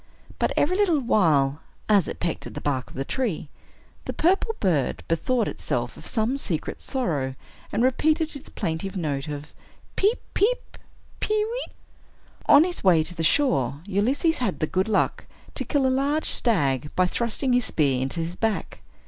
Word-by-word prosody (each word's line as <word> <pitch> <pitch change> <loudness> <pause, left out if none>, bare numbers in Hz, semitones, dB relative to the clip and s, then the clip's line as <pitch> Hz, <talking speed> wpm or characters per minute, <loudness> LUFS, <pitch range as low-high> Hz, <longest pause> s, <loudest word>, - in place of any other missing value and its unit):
But - - +1
every 355 +5 +3
little 385 -6 +3
while, 155 - +3 0.3
as 205 -5 +4
it - - -5
pecked 170 -2 -2
at - - -10
the - - -3
bark 130 -3 -1
of - - -14
the 135 - -3
tree, 210 - -2 0.6
the - - -3
purple 385 +6 +2
bird 160 -10 0
bethought 220 +9 +1
itself - - -3
of - - -10
some 230 +4 0
secret 175 - -3
sorrow, 150 - -2 0.4
and 235 - +1
repeated 310 +5 +2
its 280 - -9
plaintive 180 +5 -3
note 145 -4 -2
of 150 0 -6 0.4
"Peep, 420 +5 +2
peep, 475 +5 0 0.4
pe 430 - 0
weep!" 450 +4 -2 0.8
On 285 +2 +8
his 355 0 -3
way 175 -5 +5
to 170 - -6
the 165 - -4
shore, 145 - +2
Ulysses 250 - +1
had 225 -7 -1
the 155 - +2
good 190 +5 0
luck 210 - +1 0.3
to - - -2
kill 285 -3 +1
a - - +4
large 285 +4 +1
stag 145 - +1
by 185 - +4
thrusting 235 +6 0
his 245 -2 +3
spear 135 -5 +1
into 135 +6 -2
his 165 +2 -4
back. 220 +1 -2
205 Hz, 175 wpm, -25 LUFS, -, 0.8 s, On